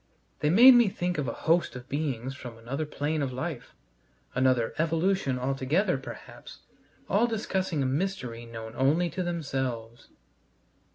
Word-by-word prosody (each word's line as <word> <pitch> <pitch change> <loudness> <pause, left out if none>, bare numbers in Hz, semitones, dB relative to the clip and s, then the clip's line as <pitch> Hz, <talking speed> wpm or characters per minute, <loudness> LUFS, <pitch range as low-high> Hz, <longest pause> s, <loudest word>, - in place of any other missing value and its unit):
They 150 - +1
made 240 +10 +9
me 240 -4 +5
think 180 -3 -2
of 140 - -2
a - - -1
host 165 -2 +2
of 125 0 -9
beings 135 -4 -2
from 125 -4 -9
another 135 +7 -4
plane 150 +1 -2
of 135 -2 -1
life, 130 +1 -5 0.6
another 125 -2 +2
evolution 165 -3 +1
altogether, 135 +9 0
perhaps, 120 -4 -11 0.5
all 220 +5 +3
discussing 190 -8 -1
a - - 0
mystery 130 -6 -2
known 115 -1 -8
only 155 +6 +2
to 185 - -3
themselves. 130 -9 -3
140 Hz, 145 wpm, -28 LUFS, 125-175 Hz, 0.6 s, made